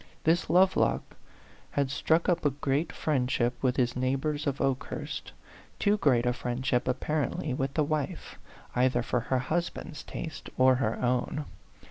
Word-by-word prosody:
This 165 +2 +2
Lovelock 185 +1 +3 0.6
had 140 -2 +1
struck 160 +3 +2
up 175 -1 +2
a 145 - +4
great 140 +3 -1
friendship 125 -4 0
with 130 -2 +1
his 120 -1 +1
neighbors 135 +4 -1
of 140 -1 -1
Okehurst 135 -1 -2 0.5
too 205 +1 +2
great 125 - +3
a 125 - +2
friendship, 125 0 -1
apparently, 145 +2 -1
with 135 +1 -2
the 155 - +3
wife, 150 0 -3 0.4
either 125 -1 +2
for 125 - 0
her 130 +3 0
husband's 155 +2 -3
taste 160 -4 -7
or 130 0 +6
her 115 -3 -1
own. 125 +4 0
135 Hz, 145 wpm, -29 LUFS, 125-155 Hz, 0.6 s, or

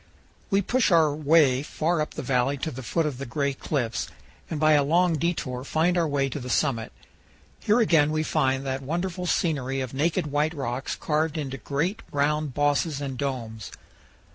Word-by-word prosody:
We 200 +1 +2
push 250 +4 +2
our 160 -5 +4
way 150 -3 +4
far 155 +2 -1
up 150 - -4
the 150 - -4
valley 130 +2 +1
to 160 +4 -3
the 130 -1 -7
foot 160 +7 0
of 140 -4 -3
the 140 - -4
Gray 140 +3 -1
Cliffs, 130 -4 -2 0.4
and 155 - -3
by 155 0 +4
a 145 -1 +4
long 170 +4 +3
detour 145 -6 -2
find 160 +5 +1
our 170 -2 +2
way 140 -2 0
to 140 - -5
the 125 -1 -7
summit. 120 -4 0 0.7
Here 215 +3 +2
again 160 -9 +4
we 155 0 0
find 135 -4 0
that 135 0 -2
wonderful 175 +5 -3
scenery 135 -7 0
of 130 -1 -4
naked 155 +3 0
white 150 +2 0
rocks 130 -2 -3
carved 155 0 -1
into 135 -3 -4
great 165 +11 -2
round 145 -1 0
bosses 145 +1 +1
and 140 -2 -4
domes. 120 -5 -4
145 Hz, 185 wpm, -26 LUFS, 135-160 Hz, 0.7 s, our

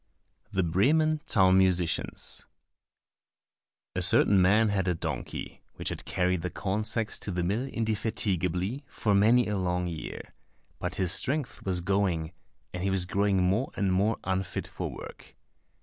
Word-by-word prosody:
27 - - -10
The 85 - -3
Bremen 155 - +3
Town 95 -2 +4
Musicians 90 -3 0 1.5
A - - 0
certain 100 -2 +5
man 105 +4 +4
had 95 -2 0
a 90 - +1
donkey, - - -5
which - - -2
had - - -6
carried 90 -1 0
the 90 - -3
corn 100 +3 -2
sacks 110 0 -1
to - - -4
the 90 -2 -1
mill 105 +9 -1
indefatigably 105 - -1
for 105 - -1
many 110 +5 +5
a 105 -2 -1
long 90 -1 -1
year; 85 -3 -7 0.5
but 90 0 -3
his 90 -3 +2
strength 140 - +1
was 90 -2 0
going, 90 -4 0 0.4
and 90 - -4
he 95 - 0
was 95 -2 +2
growing 95 0 +1
more 100 +9 +1
and 95 -2 +1
more 105 +4 +2
unfit 95 0 -2
for - - -5
work. - - -11
95 Hz, 155 wpm, -28 LUFS, 90-110 Hz, 1.5 s, certain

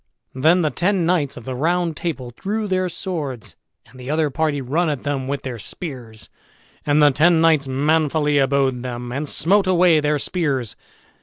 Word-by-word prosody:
Then 160 +7 +3
the 155 - 0
ten 185 -1 0
knights 165 -7 0
of 120 - -10
the 130 - -4
Round 165 +4 0
Table 140 -8 -4
drew 210 - -3
their 185 -1 0
swords, 155 - -5 0.3
and 130 - -17
the 125 +1 -8
other 155 -1 0
party 150 0 -1
run 155 +6 0
at 145 -4 -3
them 140 -2 -2
with 140 +1 -3
their 125 -3 -5
spears, 120 - -7 0.6
and 150 +1 +4
the 145 - +6
ten 160 +4 +3
knights 160 -4 +3
manfully 150 +1 +1
abode 135 -2 +1
them, 120 -1 -6
and 140 +3 -3
smote 195 +6 +2
away 175 -3 +4
their 150 0 +1
spears. 140 - -2
150 Hz, 175 wpm, -21 LUFS, 130-170 Hz, 0.6 s, the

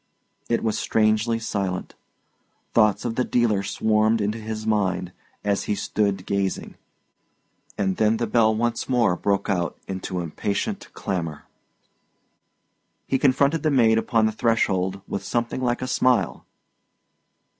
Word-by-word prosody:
It 115 - +1
was 110 -2 0
strangely 110 +1 +2
silent. 100 -5 -3 0.8
Thoughts 105 -2 +3
of 115 - -1
the 125 - +3
dealer 115 -5 +1
swarmed 110 +2 +2
into 105 +2 -1
his 110 0 -5
mind, 95 -4 0 0.3
as 100 -1 0
he 105 - 0
stood 100 -2 -1
gazing. 100 -1 -2 1.0
And 95 -2 0
then 110 +1 +3
the 120 - 0
bell 110 0 +3
once 120 +3 -1
more 115 -8 +3
broke 100 +2 0
out 90 -4 -1
into 95 -1 -4
impatient 100 - -3
clamour. 85 -5 -4 1.6
He 135 - 0
confronted 140 +3 +3
the 155 - +2
maid 115 -5 +4
upon 115 -1 +2
the 110 - +2
threshold 100 -4 0
with 100 - -4
something 120 +2 -2
like 120 0 0
a - - -3
smile. 125 -1 +1
110 Hz, 135 wpm, -24 LUFS, 100-115 Hz, 1.6 s, maid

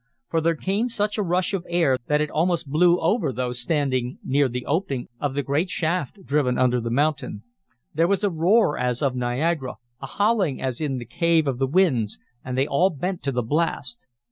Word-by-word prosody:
For 165 - +1
there 165 +1 +2
came 200 +9 -1
such 210 -1 -1
a - - +3
rush 185 +1 0
of 190 -3 -1
air 165 -7 +2
that 150 0 +2
it 150 - -2
almost 170 0 0
blew 175 +3 +4
over 170 - +1
those 125 0 -3
standing 130 -3 -1
near 140 0 +2
the 125 +1 -5
opening 145 -5 -2
of 140 -2 -2
the 145 - 0
great 145 +7 0
shaft 180 +2 -2
driven 140 -4 +1
under 125 -1 +2
the 115 - -3
mountain. 140 -4 -1 0.5
There 165 +3 +2
was 200 +2 0
a 205 - +2
roar 175 +2 +3
as 125 +1 -1
of 135 -2 +1
Niagara, 130 +3 -1 0.3
a 135 - -5
howling 200 - +1
as 130 +1 -3
in 140 -4 -1
the 120 - -6
Cave 165 +4 +2
of 130 -3 -2
the 135 - +2
Winds, 130 - +2 0.3
and 130 0 -4
they 135 - +3
all 165 +7 +3
bent 180 +3 -4
to 140 - -1
the 125 -1 -1
blast. 140 -3 -2
150 Hz, 205 wpm, -24 LUFS, 130-175 Hz, 0.5 s, blew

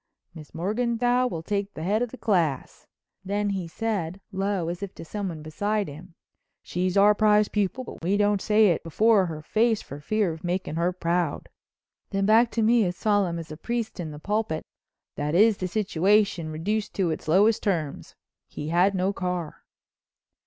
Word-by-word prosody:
"Miss 155 -3 -12
Morganthau 240 +6 +1
will 165 -7 -5
take 200 +2 -2
the 155 - -5
head 205 +6 +1
of 245 - -1
the 260 - -10
class," 170 - -1 0.4
then 205 +1 -1
he 190 -3 -3
said, 195 -2 -3
low, 195 -3 -1
as 175 +2 -4
if 200 -2 -6
to - - -9
someone 180 -5 -5
beside 205 +6 -1
him: 165 +4 -11 0.5
"She's 180 +2 -1
our 205 +1 +6
prize 210 0 +3
pupil 210 +5 -1
but 230 - -10
we 195 +4 +1
don't 205 -1 +2
say 215 -1 +4
it 170 - +1
before 200 +3 +3
her 155 -2 -6
face 220 +5 +2
for 140 - -9
fear 200 +3 0
of 160 - -11
making 180 -1 -2
her 170 +2 +1
proud," 175 -1 -1 0.6
then 195 -1 0
back 225 +3 +5
to 225 - +1
me 230 +1 +4
as 180 0 -3
solemn 205 -5 +1
as 165 -2 -7
a 155 - -7
priest 235 +2 -3
in 165 -3 -4
the 150 - -8
pulpit, 205 -2 -2 0.5
"That 150 +2 -1
is 215 +2 +5
the 185 - -2
situation 195 -3 +1
reduced 200 +7 -2
to 185 -4 +1
its 155 - -5
lowest 205 +7 +4
terms—he 155 -3 -5
had 180 +4 +3
no 190 +2 0
car." 180 -4 -4
195 Hz, 180 wpm, -26 LUFS, 170-210 Hz, 0.6 s, our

